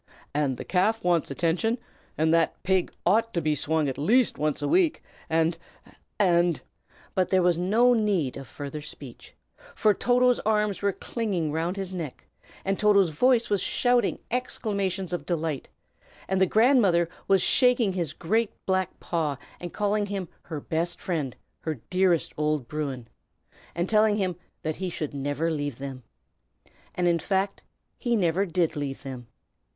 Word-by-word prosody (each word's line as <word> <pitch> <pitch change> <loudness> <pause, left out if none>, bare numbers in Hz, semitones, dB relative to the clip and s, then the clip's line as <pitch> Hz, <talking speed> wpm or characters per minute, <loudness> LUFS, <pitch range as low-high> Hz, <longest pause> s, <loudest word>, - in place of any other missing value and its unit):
And 140 -3 0
the - - -7
calf 215 +5 +1
wants 175 -3 +2
attention, 170 - 0 0.4
and 160 +1 +3
that 165 -1 +1
pig 190 -1 +1
ought 225 +5 +2
to - - +2
be 155 -1 +1
swung 155 +1 0
at 135 - -3
least 230 - +3
once 150 -1 0
a - - +1
week, 360 -4 +2 0.3
and 165 +1 +1 0.6
and 175 -4 +3 0.3
" - - -28
But 185 -1 +1
there 185 -1 +3
was 175 -1 +3
no 225 +7 +4
need 200 - +1
of 135 - -8
further 145 +1 -6
speech, 145 -4 -11 0.4
for 215 - +4
Toto's 250 +2 +3
arms 210 -2 0
were 200 0 +2
clinging 190 -7 -2
round 165 +5 -1
his 190 -1 -4
neck, 165 -7 -6 0.4
and 195 0 0
Toto's 200 -5 +4
voice 240 - +3
was 200 -3 +2
shouting 245 -4 +2
exclamations 200 -7 -2
of 175 - -4
delight; 160 -5 -2 0.6
and 190 0 0
the 190 - +5
grandmother 215 -7 +4 0.2
was 195 -2 +4
shaking 250 -6 +3
his 170 -5 -2
great 220 +8 0
black 190 -1 -1
paw, 155 -5 -1 0.2
and 175 -1 -6
calling 205 0 0
him 195 -3 -3
her 160 -3 -6
best 165 +4 -2
friend, 155 -8 -2 0.2
her 160 -1 -3 0.2
dearest 185 -3 +2
old 150 -4 0
Bruin, 140 -5 -4 0.7
and 170 +2 0
telling 215 0 +4
him 185 -3 0 0.3
that 155 -1 -2
he 190 -1 -3
should 155 -4 -4
never 145 +4 -1
leave 145 -5 -3
them. 135 -1 -6 0.9
And, 180 -1 +1
in 170 -1 +3
fact, 195 +3 -1 0.4
he 240 -2 +1
never 190 0 +1
did 170 -2 0
leave 140 -2 -4
them. 130 -3 -7
180 Hz, 160 wpm, -26 LUFS, 155-205 Hz, 0.9 s, the